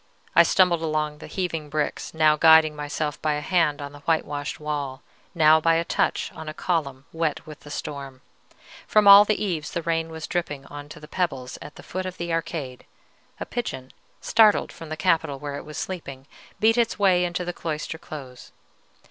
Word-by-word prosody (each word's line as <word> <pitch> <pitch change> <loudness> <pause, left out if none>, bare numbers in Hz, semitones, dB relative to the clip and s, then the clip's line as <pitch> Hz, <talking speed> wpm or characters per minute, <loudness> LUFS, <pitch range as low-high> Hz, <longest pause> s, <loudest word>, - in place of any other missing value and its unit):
I 170 - +9
stumbled 170 0 +3
along 155 -2 -2
the - - -9
heaving 165 -5 -3
bricks, 150 +1 -2
now 155 -1 +4
guiding 160 -1 +6
myself 150 0 -4
by 155 -1 +1
a 150 - -2
hand 155 -4 +1
on 140 - -7
the 145 - -12
whitewashed 145 -2 -2
wall, 145 -3 -4 0.3
now 160 -1 +6
by 165 +1 +3
a 165 +1 0
touch - - 0
on 160 -1 -7
a 155 - -8
column 140 -7 -2
wet 160 -2 -2
with 155 -1 -11
the 145 - -14
storm. 140 -3 -6 0.7
From 210 -1 +4
all 200 +1 +10
the 215 0 0
eaves 160 -6 -2
the 170 - -4
rain 165 0 -1
was 160 -1 -7
dripping 150 -6 -3
on 145 +1 -10
to - - -10
the 150 - -12
pebbles 135 -8 -3
at 145 - -10
the - - -12
foot 185 +1 -4
of 185 - -7
the 170 -1 -3
arcade: 150 -6 -4 0.5
a - - -4
pigeon, 130 - -5 0.3
startled 220 -2 +4
from 165 - -11
the 155 - -5
capital 160 -5 +1
where 145 0 -6
it - - -9
was 150 - -9
sleeping, 140 -8 -6 0.3
beat 225 +2 +4
its 235 -1 +1
way 185 -3 +3
into 175 0 -2
the 175 - -3
cloister 160 0 -5
close. 130 -6 -10
155 Hz, 195 wpm, -24 LUFS, 145-170 Hz, 0.7 s, all